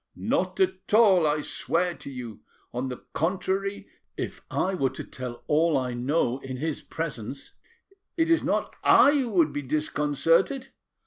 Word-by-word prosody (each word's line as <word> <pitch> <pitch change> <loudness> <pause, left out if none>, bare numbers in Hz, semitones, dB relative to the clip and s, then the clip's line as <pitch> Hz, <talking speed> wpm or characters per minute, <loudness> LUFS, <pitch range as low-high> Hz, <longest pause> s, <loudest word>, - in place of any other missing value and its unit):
"Not - - -1
at 355 - 0
all, 195 -8 +6
I 150 0 +1
swear 175 +4 0
to 140 - -10
you. 125 -5 -7 0.3
On 125 +2 -2
the 125 - -8
contrary, 190 +4 -1 0.3
if - - -5
I 190 - 0
were 135 -8 +1
to 130 - -7
tell 120 -2 -8
all 155 0 +3
I 125 -2 -2
know 125 +1 0
in 130 -1 -6
his 155 +2 -3
presence, 140 -5 -6 0.6
it 325 0 +2
is 330 - +4
not - - -1
I 285 - +7
who 270 -5 +1
would 165 -5 +3
be 145 - -2
disconcerted. 155 - +1
155 Hz, 155 wpm, -26 LUFS, 130-190 Hz, 0.6 s, I